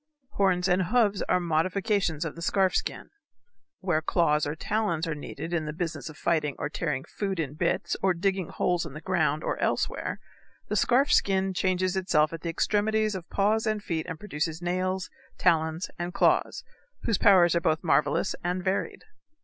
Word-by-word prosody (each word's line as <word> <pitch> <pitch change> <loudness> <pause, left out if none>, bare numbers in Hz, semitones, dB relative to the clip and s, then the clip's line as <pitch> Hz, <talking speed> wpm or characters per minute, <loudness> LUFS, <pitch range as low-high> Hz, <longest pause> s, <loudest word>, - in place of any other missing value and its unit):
Horns 190 -5 +2
and 185 0 +2
hoofs 210 -1 +2
are - - +3
modifications 175 0 0
of 160 - -5
the 170 - -9
scarf 190 +2 +2
skin. - - -3 0.7
Where 175 -5 +1
claws 150 -2 +2
or 150 - -3
talons 190 -3 -1
are 160 - -1
needed 150 +2 -7
in 160 -2 0
the 150 - -3
business 165 0 -4
of 155 - -12
fighting 155 -4 0
or 145 - -3
tearing 150 -4 -2
food 195 -3 -3
in 145 -4 -2
bits 155 - -1
or 190 -2 +2
digging 190 0 -1
holes 175 -1 0
in 160 -5 -8
the 150 - -7
ground 155 -5 0
or - - -2
elsewhere, - - -1 0.5
the - - -1
scarf 265 +4 +3
skin 190 -1 +2
changes 185 0 0
itself 165 -5 +2
at 165 - -6
the 170 - -3
extremities 215 +4 +1
of 180 -3 -7
paws 215 +3 +1
and 215 -1 -1
feet 160 -4 -3
and 165 - -5
produces 160 -5 -3
nails, 185 +1 -2 0.3
talons, 160 0 +1
and 175 +1 -4
claws, - - +2 0.4
whose 225 - +1
powers 180 -5 +6
are 170 - +2
both 160 0 +1
marvelous 165 +3 +2
and 180 +1 -1
varied. 190 +1 -2
180 Hz, 180 wpm, -27 LUFS, 160-195 Hz, 0.7 s, powers